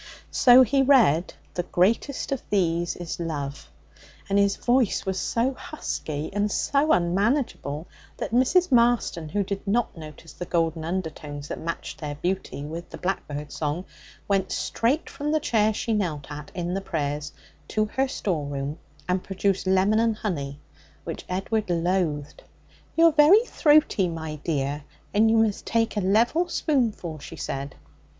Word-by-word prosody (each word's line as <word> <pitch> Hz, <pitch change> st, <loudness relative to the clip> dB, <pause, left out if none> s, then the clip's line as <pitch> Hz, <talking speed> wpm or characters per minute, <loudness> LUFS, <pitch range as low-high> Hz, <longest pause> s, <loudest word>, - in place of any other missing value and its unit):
So 250 Hz, +1 st, +7 dB
he 275 Hz, +2 st, +2 dB
read, 230 Hz, -, +4 dB, 0.2 s
'The 175 Hz, -, -1 dB
greatest 220 Hz, +12 st, 0 dB
of 270 Hz, -, -1 dB
these 175 Hz, -3 st, +1 dB
is 175 Hz, -1 st, -6 dB
love,' 145 Hz, -, -4 dB, 0.6 s
and 200 Hz, 0 st, +2 dB
his 200 Hz, 0 st, +3 dB
voice 245 Hz, -3 st, +1 dB
was 190 Hz, -1 st, -1 dB
so 245 Hz, +4 st, 0 dB
husky 155 Hz, -, -5 dB
and 205 Hz, +1 st, 0 dB
so 285 Hz, +8 st, +1 dB
unmanageable 180 Hz, -, +1 dB, 0.3 s
that -, -, -4 dB
Mrs. 270 Hz, +9 st, +3 dB
Marston, 235 Hz, -9 st, +2 dB
who 200 Hz, +6 st, 0 dB
did 200 Hz, +1 st, -5 dB
not 230 Hz, +3 st, +1 dB
notice 155 Hz, 0 st, -11 dB
the 175 Hz, -, -7 dB
golden 165 Hz, -2 st, 0 dB
undertones 155 Hz, -4 st, -5 dB
that -, -, -4 dB
matched 165 Hz, -1 st, -5 dB
their 145 Hz, -1 st, -4 dB
beauty 180 Hz, -2 st, -3 dB
with 165 Hz, +3 st, -7 dB
the -, -, -8 dB
blackbird's 150 Hz, -5 st, -4 dB
song, 155 Hz, +4 st, -2 dB, 0.4 s
went 195 Hz, -2 st, +1 dB
straight 260 Hz, +8 st, 0 dB
from 295 Hz, +1 st, -3 dB
the 310 Hz, -, +3 dB
chair 220 Hz, -7 st, +2 dB
she 225 Hz, +2 st, -2 dB
knelt 160 Hz, -9 st, -2 dB
at 145 Hz, 0 st, -8 dB
in 175 Hz, 0 st, -2 dB
the 195 Hz, -, -1 dB
prayers 150 Hz, -5 st, -3 dB, 0.4 s
to 215 Hz, 0 st, +1 dB
her 265 Hz, +5 st, 0 dB
store 175 Hz, -, -2 dB
room, 140 Hz, +2 st, -4 dB, 0.3 s
and 180 Hz, 0 st, 0 dB
produced 195 Hz, 0 st, -1 dB
lemon 190 Hz, +3 st, +3 dB
and 225 Hz, -1 st, +2 dB
honey, 145 Hz, -10 st, -4 dB, 0.4 s
which -, -, -6 dB
Edward 195 Hz, +3 st, -1 dB
loathed. 165 Hz, -4 st, -1 dB, 0.5 s
'You're 330 Hz, 0 st, +6 dB
very 315 Hz, +10 st, +6 dB
throaty, 295 Hz, -, +3 dB
my 160 Hz, -2 st, -5 dB
dear, 145 Hz, -1 st, -2 dB, 0.3 s
and 215 Hz, +2 st, +4 dB
you 225 Hz, -, +4 dB
must 220 Hz, -2 st, +1 dB
take 225 Hz, -1 st, +1 dB
a 205 Hz, -, 0 dB
level 235 Hz, -, +2 dB
spoonful,' 225 Hz, -, -1 dB
she -, -, -9 dB
said. 140 Hz, 0 st, -5 dB
190 Hz, 155 wpm, -25 LUFS, 160-230 Hz, 0.6 s, So